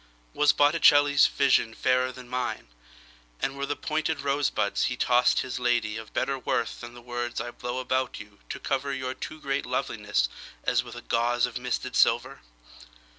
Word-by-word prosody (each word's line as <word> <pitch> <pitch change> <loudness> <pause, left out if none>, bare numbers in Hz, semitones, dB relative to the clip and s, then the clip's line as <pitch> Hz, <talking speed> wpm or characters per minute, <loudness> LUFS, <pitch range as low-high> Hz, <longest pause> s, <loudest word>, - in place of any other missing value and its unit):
Was 150 0 +4
Botticelli's 145 -1 +5
visionFairer 130 -1 +2
than 125 -1 -11
mine; 125 - -3 0.7
And 135 - -2
were 140 0 -3
the 145 - -1
pointed 155 0 -1
rosebudsHe 140 -4 0
tossed 125 0 +3
his 130 0 -4
ladyOf 110 -3 -1
better 135 -1 -1
worthThan 120 -1 -3
the 120 - -12
words 120 0 -4
I 120 - -4
blow 120 +1 -5
about 130 0 -1
youTo 105 -1 -10
cover 140 +1 -1
your 130 0 -3
too 155 +4 -7
great 135 -2 -2
lovelinessAs - - -1
with - - -10
a - - -9
gauzeOf 120 +1 0
misted 125 0 -3
silver? - - +2
125 Hz, 140 wpm, -27 LUFS, 120-140 Hz, 0.7 s, Botticelli's